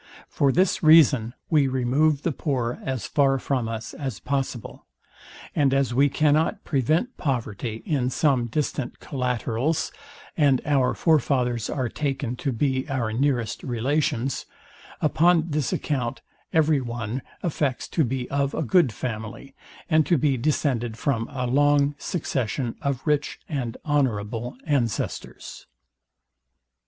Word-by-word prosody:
For 140 Hz, -1 st, +2 dB
this 185 Hz, +5 st, +2 dB
reason 145 Hz, -7 st, +5 dB, 0.2 s
we 150 Hz, -4 st, +4 dB
remove 135 Hz, +4 st, +1 dB
the 170 Hz, -, +1 dB
poor 125 Hz, -5 st, -2 dB
as 130 Hz, -5 st, -3 dB
far 135 Hz, -2 st, +2 dB
from 130 Hz, -3 st, -1 dB
us 115 Hz, 0 st, -5 dB
as 130 Hz, -9 st, -5 dB
possible; 135 Hz, -4 st, -4 dB, 0.7 s
and 140 Hz, -3 st, +3 dB
as 135 Hz, -3 st, +1 dB
we 140 Hz, +3 st, +4 dB
cannot 155 Hz, +2 st, +2 dB
prevent 155 Hz, -, 0 dB
poverty 115 Hz, -4 st, -3 dB
in 135 Hz, -5 st, 0 dB
some 130 Hz, -4 st, +2 dB
distant 145 Hz, +1 st, -3 dB
collaterals, 125 Hz, +2 st, -1 dB, 0.4 s
and 140 Hz, -5 st, +4 dB
our 140 Hz, -3 st, +2 dB
forefathers 125 Hz, -7 st, +1 dB
are 130 Hz, -4 st, -1 dB
taken 135 Hz, -2 st, -2 dB
to 135 Hz, -, -2 dB
be 130 Hz, +3 st, -1 dB
our 120 Hz, -5 st, -1 dB
nearest 125 Hz, -2 st, 0 dB
relations; 130 Hz, +1 st, -1 dB, 0.5 s
upon 165 Hz, +1 st, +3 dB
this 145 Hz, -3 st, 0 dB
account 125 Hz, -6 st, -2 dB, 0.3 s
every 155 Hz, -3 st, +3 dB
one 120 Hz, 0 st, -4 dB, 0.2 s
affects 145 Hz, -6 st, -1 dB
to 160 Hz, -, +1 dB
be 125 Hz, -1 st, -2 dB
of 140 Hz, 0 st, 0 dB
a -, -, -1 dB
good 150 Hz, 0 st, +3 dB
family, 110 Hz, +3 st, -6 dB, 0.3 s
and 155 Hz, -3 st, +3 dB
to 170 Hz, -, +4 dB
be 140 Hz, -1 st, +2 dB
descended 125 Hz, -4 st, 0 dB
from 115 Hz, -5 st, -1 dB
a 130 Hz, -3 st, -3 dB
long 145 Hz, +2 st, +3 dB
succession 130 Hz, -, -2 dB
of 140 Hz, -2 st, -2 dB
rich 150 Hz, -1 st, 0 dB
and 130 Hz, -6 st, -3 dB
honourable 120 Hz, -5 st, -1 dB
ancestors. 125 Hz, -8 st, -3 dB
135 Hz, 130 wpm, -25 LUFS, 120-145 Hz, 0.7 s, reason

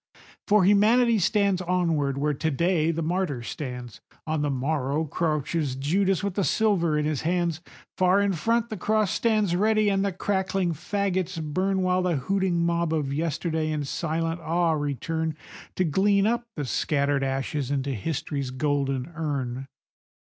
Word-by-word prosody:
For 210 Hz, -3 st, +5 dB
Humanity 220 Hz, +3 st, +4 dB
sweeps 200 Hz, 0 st, +2 dB
onward: 165 Hz, -6 st, 0 dB
where 150 Hz, +1 st, +1 dB
to 160 Hz, +3 st, -1 dB
day 165 Hz, +2 st, +1 dB
the 165 Hz, 0 st, -1 dB
martyr 165 Hz, -7 st, -1 dB
stands, 125 Hz, -6 st, -6 dB, 0.2 s
On 155 Hz, -1 st, -1 dB
the 145 Hz, -, 0 dB
morrow 140 Hz, +2 st, -1 dB
crouches 150 Hz, -2 st, -1 dB
Judas 185 Hz, +8 st, +1 dB
with 200 Hz, -2 st, -1 dB
the 200 Hz, -, 0 dB
silver 180 Hz, -8 st, +2 dB
in 150 Hz, -, 0 dB
his 150 Hz, -3 st, -1 dB
hands; 170 Hz, -1 st, 0 dB, 0.4 s
Far 185 Hz, +1 st, +4 dB
in 200 Hz, -1 st, +2 dB
front 230 Hz, +7 st, 0 dB
the 215 Hz, -, -3 dB
cross 215 Hz, +1 st, +1 dB
stands 215 Hz, -6 st, +1 dB
ready 215 Hz, +2 st, +3 dB
and 195 Hz, -1 st, +1 dB
the 200 Hz, -, 0 dB
crackling 190 Hz, -1 st, -1 dB
fagots 185 Hz, +1 st, -2 dB
burn, 185 Hz, +5 st, 0 dB
While 185 Hz, 0 st, +2 dB
the 180 Hz, -2 st, +1 dB
hooting 175 Hz, +4 st, 0 dB
mob 170 Hz, -1 st, 0 dB
of 145 Hz, -4 st, -1 dB
yesterday 160 Hz, +1 st, -1 dB
in 155 Hz, -1 st, -1 dB
silent 165 Hz, +3 st, -2 dB
awe 170 Hz, +1 st, +1 dB
return 155 Hz, +2 st, -2 dB, 0.4 s
To 185 Hz, -, +1 dB
glean 195 Hz, +5 st, +2 dB
up 235 Hz, +2 st, 0 dB
the 145 Hz, -, -3 dB
scattered 140 Hz, +1 st, 0 dB
ashes 135 Hz, 0 st, -2 dB
into 140 Hz, -1 st, -1 dB
History's 140 Hz, +2 st, -3 dB
golden 135 Hz, +1 st, -1 dB
urn. 135 Hz, -5 st, -3 dB
165 Hz, 155 wpm, -26 LUFS, 145-190 Hz, 0.4 s, For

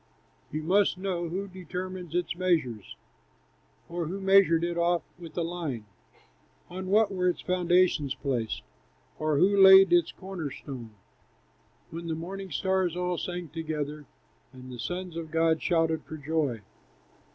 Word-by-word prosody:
You 155 Hz, +1 st, -3 dB
must 190 Hz, +3 st, +3 dB
know! 180 Hz, -3 st, -2 dB
Who 195 Hz, +4 st, -3 dB
determined 185 Hz, -1 st, -6 dB
its 175 Hz, -1 st, -1 dB
measures? 160 Hz, -, -1 dB, 0.9 s
Or 170 Hz, -1 st, -3 dB
who 190 Hz, +4 st, -4 dB
measured 190 Hz, -4 st, +5 dB
it 170 Hz, 0 st, -1 dB
off 170 Hz, 0 st, +1 dB, 0.2 s
with 165 Hz, -2 st, -11 dB
a 170 Hz, -, +1 dB
line? 165 Hz, -10 st, -4 dB, 0.9 s
On 185 Hz, +1 st, -5 dB
what 205 Hz, +1 st, +3 dB
were 180 Hz, -1 st, +1 dB
its 175 Hz, -, -3 dB
foundations 180 Hz, -6 st, +2 dB
placed? 130 Hz, -5 st, -2 dB, 0.6 s
Or 155 Hz, -1 st, +1 dB
who 195 Hz, +6 st, +4 dB
laid 190 Hz, -, +9 dB
its 350 Hz, -1 st, +4 dB
corner 185 Hz, -6 st, -6 dB
stone, 120 Hz, -6 st, -9 dB, 1.0 s
When 170 Hz, +1 st, -6 dB
the 160 Hz, -, -1 dB
morning 190 Hz, +4 st, -6 dB
stars 185 Hz, +1 st, 0 dB
all 180 Hz, -1 st, -1 dB
sang 175 Hz, -2 st, -5 dB
together, 150 Hz, -2 st, -4 dB, 0.4 s
And 130 Hz, -1 st, -11 dB
the 125 Hz, -, -8 dB
sons 180 Hz, +4 st, -4 dB
of 165 Hz, -1 st, -5 dB
God 160 Hz, 0 st, +2 dB
shouted 165 Hz, -2 st, +1 dB
for 155 Hz, -, -7 dB
joy? 145 Hz, -6 st, -1 dB
170 Hz, 145 wpm, -28 LUFS, 155-185 Hz, 1.0 s, laid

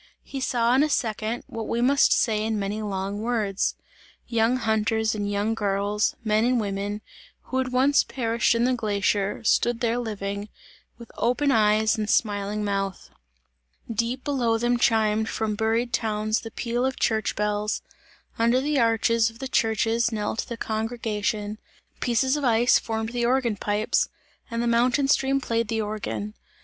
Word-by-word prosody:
He 275 Hz, -, -6 dB
saw 240 Hz, -2 st, +2 dB
in 265 Hz, -, +4 dB
a 305 Hz, -, +2 dB
second, 225 Hz, -2 st, -1 dB
what 225 Hz, -1 st, -6 dB
we 230 Hz, -, -1 dB
must 275 Hz, +3 st, +4 dB
say 215 Hz, -3 st, +2 dB
in 220 Hz, 0 st, -1 dB
many 205 Hz, +2 st, -2 dB
long 200 Hz, 0 st, -3 dB
words. 215 Hz, -4 st, 0 dB, 0.5 s
Young 235 Hz, +1 st, +2 dB
hunters 220 Hz, -1 st, +1 dB
and 205 Hz, -1 st, -2 dB
young 205 Hz, +2 st, 0 dB
girls, 205 Hz, -1 st, 0 dB
men 215 Hz, 0 st, +2 dB
and 245 Hz, 0 st, +2 dB
women, 205 Hz, 0 st, -3 dB, 0.4 s
who 260 Hz, -, -2 dB
had 255 Hz, -1 st, -1 dB
once 270 Hz, +3 st, +4 dB
perished 235 Hz, -2 st, 0 dB
in 230 Hz, -, +2 dB
the 255 Hz, +1 st, +2 dB
glacier, 205 Hz, -2 st, 0 dB
stood 235 Hz, +1 st, +2 dB
there 240 Hz, -1 st, 0 dB
living, 205 Hz, -2 st, -4 dB, 0.5 s
with 235 Hz, -1 st, -12 dB
open 250 Hz, +5 st, +2 dB
eyes 220 Hz, -1 st, +3 dB
and 210 Hz, 0 st, -2 dB
smiling 205 Hz, -1 st, 0 dB
mouth; 195 Hz, -2 st, -3 dB, 0.8 s
deep 230 Hz, +4 st, -2 dB
below 245 Hz, -6 st, +1 dB
them 240 Hz, +1 st, +1 dB
chimed 220 Hz, -1 st, +2 dB
from 220 Hz, -1 st, -1 dB
buried 225 Hz, +3 st, 0 dB
towns 215 Hz, 0 st, 0 dB
the 225 Hz, -, -8 dB
peal 240 Hz, +2 st, -2 dB
of 260 Hz, 0 st, -1 dB
church 220 Hz, -2 st, 0 dB
bells; 210 Hz, 0 st, -1 dB, 0.6 s
under 235 Hz, +2 st, +3 dB
the 290 Hz, +1 st, 0 dB
arches 230 Hz, -1 st, +3 dB
of 225 Hz, -, -15 dB
the 265 Hz, -, -5 dB
churches 225 Hz, 0 st, +1 dB
knelt 220 Hz, 0 st, -2 dB
the 235 Hz, -, -5 dB
congregation; 215 Hz, -2 st, -2 dB, 0.4 s
pieces 260 Hz, +3 st, +1 dB
of 295 Hz, -, -3 dB
ice 240 Hz, -1 st, +4 dB
formed 220 Hz, -1 st, -3 dB
the 240 Hz, 0 st, -2 dB
organ 240 Hz, -2 st, +1 dB
pipes, 205 Hz, +1 st, 0 dB, 0.4 s
and 230 Hz, 0 st, -2 dB
the -, -, 0 dB
mountain 245 Hz, +4 st, +2 dB
stream 275 Hz, -1 st, +2 dB
played 230 Hz, -3 st, -1 dB
the 225 Hz, 0 st, -1 dB
organ. 210 Hz, -1 st, -4 dB
225 Hz, 160 wpm, -25 LUFS, 210-240 Hz, 0.8 s, in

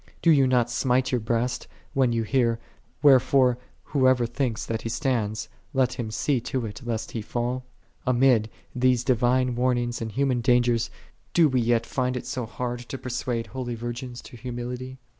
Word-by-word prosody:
9 165 Hz, -, +7 dB
Dost 145 Hz, -, +5 dB
thou 135 Hz, -, +5 dB
not 125 Hz, -2 st, +2 dB
smite 125 Hz, +1 st, +1 dB
thy 125 Hz, -, +2 dB
breast, 115 Hz, +2 st, -1 dB, 0.3 s
when 135 Hz, -2 st, +3 dB
thou 115 Hz, -1 st, 0 dB
hearest, 115 Hz, -1 st, +1 dB, 0.3 s
" -, -, -35 dB
Wherefore, 130 Hz, -2 st, +5 dB, 0.2 s
whoso 130 Hz, -3 st, +3 dB
think 120 Hz, -2 st, -1 dB
eth -, -, -4 dB
that 115 Hz, -1 st, -3 dB
he 115 Hz, -, -4 dB
standeth, 115 Hz, -4 st, -1 dB, 0.3 s
let 130 Hz, -2 st, +2 dB
him 120 Hz, -3 st, -4 dB
see 130 Hz, +3 st, 0 dB
to 125 Hz, 0 st, -2 dB
it 105 Hz, +4 st, -7 dB
lest 115 Hz, -2 st, -3 dB
he 115 Hz, -, -3 dB
fall? 120 Hz, +3 st, -2 dB, 0.2 s
" 115 Hz, -, -28 dB
I0 -, -, +3 dB
Amid 120 Hz, -3 st, +4 dB, 0.2 s
these 125 Hz, -1 st, +2 dB
divine 125 Hz, 0 st, +2 dB
warnings 120 Hz, -1 st, 0 dB
and 110 Hz, -1 st, -3 dB
human 130 Hz, 0 st, +1 dB
dangers, 120 Hz, -1 st, +3 dB, 0.5 s
do 170 Hz, -2 st, +6 dB
we 130 Hz, -2 st, +2 dB
yet 115 Hz, 0 st, +2 dB
find 125 Hz, -1 st, -1 dB
it -, -, -6 dB
so 125 Hz, -3 st, -3 dB
hard 120 Hz, +2 st, -4 dB
to 120 Hz, +2 st, -7 dB
persuade 125 Hz, -2 st, -3 dB
holy 125 Hz, -2 st, -5 dB
virgins 120 Hz, +1 st, -6 dB
to -, -, -12 dB
humility 125 Hz, +1 st, -5 dB
125 Hz, 190 wpm, -26 LUFS, 120-130 Hz, 0.5 s, 9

